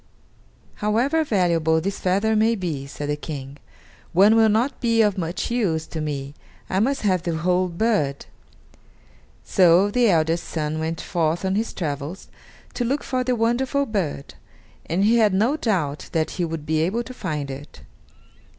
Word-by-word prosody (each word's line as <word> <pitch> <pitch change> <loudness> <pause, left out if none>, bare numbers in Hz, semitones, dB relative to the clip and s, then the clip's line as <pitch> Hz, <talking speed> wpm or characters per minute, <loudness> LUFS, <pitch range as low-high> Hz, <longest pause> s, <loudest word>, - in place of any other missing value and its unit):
"However 240 +10 +1
valuable 170 - +2
this 195 +4 -3
feather 200 +4 +1
may 220 +2 +3
be," 160 -9 -4
said 145 +1 -6
the 145 - 0
King, 140 -2 -7 0.6
"one 200 +5 +6
will 225 -1 +5
not 235 +6 0
be 230 -2 +3
of 205 -2 +2
much 175 +4 -3
use 180 -10 0
to 160 - -6
me 140 -2 -4 0.4
I 190 - +1
must 270 +5 0
have 185 -4 +2
the 170 -2 -2
whole 180 +3 +1
bird." 170 -7 0 1.2
So 185 +2 +4
the 245 0 +3
eldest 165 -1 +1
son 155 -1 -3
went 160 +1 -3
forth 170 +1 -1
on 190 - 0
his 220 +3 -1
travels, 150 +2 -5 0.4
to 245 - -2
look 270 +5 -1
for 255 -1 -1
the 250 0 0
wonderful 255 +5 +1
bird, 185 - -3 0.5
and 175 +4 0
he 225 +3 +4
had 210 -4 +3
no 225 +9 +2
doubt 175 - -2
that 160 -2 0
he 175 - -2
would 160 -2 -5
be 155 0 +1
able 200 +9 0
to 255 - -9
find 150 - -4
it. 140 +2 -10
185 Hz, 170 wpm, -23 LUFS, 160-225 Hz, 1.2 s, one